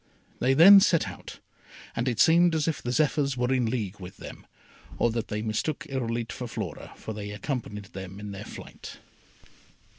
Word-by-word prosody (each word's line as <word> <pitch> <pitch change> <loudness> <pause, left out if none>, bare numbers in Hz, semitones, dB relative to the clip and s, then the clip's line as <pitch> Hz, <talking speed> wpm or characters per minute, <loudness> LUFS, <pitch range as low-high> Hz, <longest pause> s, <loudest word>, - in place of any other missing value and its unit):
They 130 +2 +2
then 195 +7 +10
set 175 -4 +3
out, - - -9 0.6
and 120 - -1
it 120 -4 -1
seemed 170 +1 +5
as 155 -1 0
if 160 - -1
the 120 - -3
Zephyrs 140 -1 +1
were 125 +1 +1
in 125 -3 +1
league 105 -5 -3
with 90 -1 -10
them, - - -11 0.5
or 120 - +2
that 115 0 -3
they 105 0 -3
mistook 110 +7 -2
Irolite 120 -3 -3
for 125 - -6
Flora, - - -6
for 110 - -7
they 105 -1 -6
accompanied 105 -2 -5
them 95 0 -8
in 105 -1 -7
their 100 +1 -7
flight. - - -10
120 Hz, 180 wpm, -27 LUFS, 105-140 Hz, 0.6 s, then